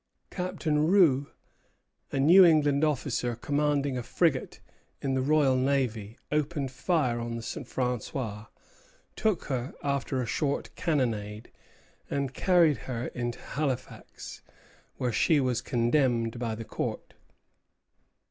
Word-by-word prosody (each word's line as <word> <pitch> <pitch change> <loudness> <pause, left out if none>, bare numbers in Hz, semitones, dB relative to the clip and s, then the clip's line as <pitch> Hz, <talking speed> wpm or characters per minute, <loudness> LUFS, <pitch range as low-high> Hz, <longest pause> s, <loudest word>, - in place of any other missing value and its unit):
Captain 170 -5 -1
Rous, 160 -8 +4 0.8
a 135 - -1
New 170 +8 +8
England 150 -4 +4
officer 125 -5 0
commanding 145 0 0
a - - -3
frigate 135 +3 0 0.4
in 135 -1 -2
the 130 - +1
Royal 140 -1 +3
Navy, 125 -5 -1
opened 150 -2 -1
fire 130 -3 0
on 115 0 -4
the 115 - -6
"St. 120 - -6
François," 120 -3 -3 0.7
took 215 -5 0
her 130 -1 -4
after 140 -2 -1
a 125 - -1
short 140 +6 -2
cannonade, 115 - -2 0.6
and 140 -2 -2
carried 170 -2 +3
her 120 -1 -3
into 120 -1 -4
Halifax, 135 -4 -5 0.6
where 125 -2 -1
she 155 +5 +3
was 125 -2 0
condemned 120 -2 +1
by 115 -2 -2
the 115 +1 -7
court. - - -5
135 Hz, 120 wpm, -28 LUFS, 120-150 Hz, 0.8 s, New